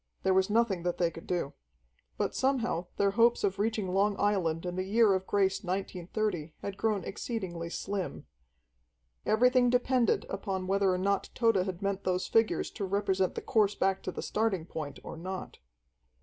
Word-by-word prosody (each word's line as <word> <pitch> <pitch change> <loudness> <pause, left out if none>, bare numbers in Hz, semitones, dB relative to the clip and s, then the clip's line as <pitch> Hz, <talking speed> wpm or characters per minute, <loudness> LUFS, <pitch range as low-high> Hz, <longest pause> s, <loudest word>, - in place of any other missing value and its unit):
There 190 - +3
was 190 +1 +3
nothing 215 -4 +2
that 175 0 -1
they 170 -2 +1
could 165 - -11
do. 175 -6 -1 0.6
But - - -1
somehow 240 -10 0
their 200 0 +3
hopes 230 +3 +3
of 195 -1 0
reaching 215 -2 0
Long 200 +1 +2
Island 180 -5 +1
in 180 0 -3
the 185 - -1
year 210 +1 +4
of 190 0 -1
grace 195 -1 +1
1930 185 -2 -3
had 200 - -4
grown 210 -3 0
exceedingly 185 -6 -4
slim. 195 +1 -4 1.0
Everything 250 +2 +4
depended 250 -1 +2
upon 195 -1 -3
whether 195 0 +2
or 180 - +1
not 200 +2 0
Tode 225 -3 +3
had 185 0 -2
meant 200 0 -1
those 185 0 0
figures 225 -1 +1
to 210 - -5
represent 190 -1 0
the - - -4
course 210 -2 +2
back 190 0 +1
to - - -4
the - - -6
starting 210 -6 0
point 150 -4 -6
or - - -7
not. 185 +3 -6
195 Hz, 175 wpm, -30 LUFS, 185-215 Hz, 1.0 s, year